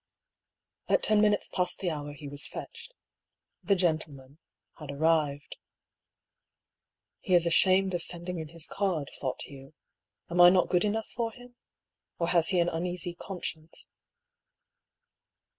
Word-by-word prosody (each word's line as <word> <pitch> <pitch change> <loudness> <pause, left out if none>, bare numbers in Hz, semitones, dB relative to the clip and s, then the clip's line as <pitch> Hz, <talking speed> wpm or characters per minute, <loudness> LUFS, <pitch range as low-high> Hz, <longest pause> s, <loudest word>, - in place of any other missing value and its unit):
At - - +2
ten 215 -1 +3
minutes 210 -1 +2
past 180 -1 -1
the 180 -3 -2
hour 145 -1 -5
he 145 0 -10
was 145 +1 -3
fetched. 470 0 -9 0.4
" - - -61 0.3
The 200 - +3
gentleman 155 -5 -2 0.2
" - - -60
had 150 -3 -9
arrived. 145 -1 0 1.6
"He 185 - +1
is 175 -1 +4
ashamed 190 +3 +4
of 175 - -1
sending 175 0 0
in 160 - -5
his 165 0 -2
card," 180 -8 -2
thought 130 -2 -3
Hugh. 135 +1 -13 0.3
" 105 +3 -51
Am 175 +1 +3
I 175 - +10
not 180 -1 +3
good 180 +1 +2
enough 220 +1 -2
for 230 -1 -1
him? 245 +1 -15 0.6
Or 170 0 -1
has 170 -1 +3
he 190 - +1
an 170 0 +2
uneasy 175 +1 -3
conscience 170 -3 -7
170 Hz, 150 wpm, -29 LUFS, 150-190 Hz, 1.6 s, I